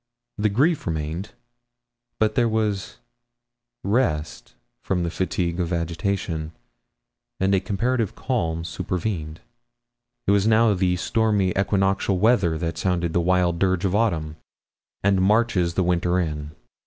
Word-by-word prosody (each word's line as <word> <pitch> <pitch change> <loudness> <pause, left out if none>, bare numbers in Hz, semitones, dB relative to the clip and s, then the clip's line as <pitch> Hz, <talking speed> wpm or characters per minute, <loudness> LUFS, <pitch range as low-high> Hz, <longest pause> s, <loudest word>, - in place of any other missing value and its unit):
The 105 +1 +2
grief 145 - +1
remained, 80 +5 -3 0.8
but 110 -1 +2
there 120 +1 +2
was 105 -3 -1 0.9
rest 110 +1 -1 0.3
from 95 -7 -1
the 85 - -2
fatigue 85 0 -1
of 85 -1 -1
agitation, 85 -1 -2 0.9
and 95 +1 +2
a 95 - +4
comparative 115 +3 -1
calm 85 -11 -1
supervened. 85 -1 -4 0.8
It - - +3
was 100 +1 +3
now 110 -1 +4
the 90 -1 +1
stormy 105 0 +1
equinoctial 95 0 +1
weather 95 -6 +3
that 80 0 -3
sounds 90 -2 0
the 85 - +1
wild 90 -1 +2
dirge 95 0 +1
of 95 - 0
autumn, 85 -8 0 0.7
and 100 -1 +3
marches 95 -4 +2
the 95 - +2
winter 90 0 +1
in. 75 -4 -3
95 Hz, 130 wpm, -23 LUFS, 85-105 Hz, 0.9 s, a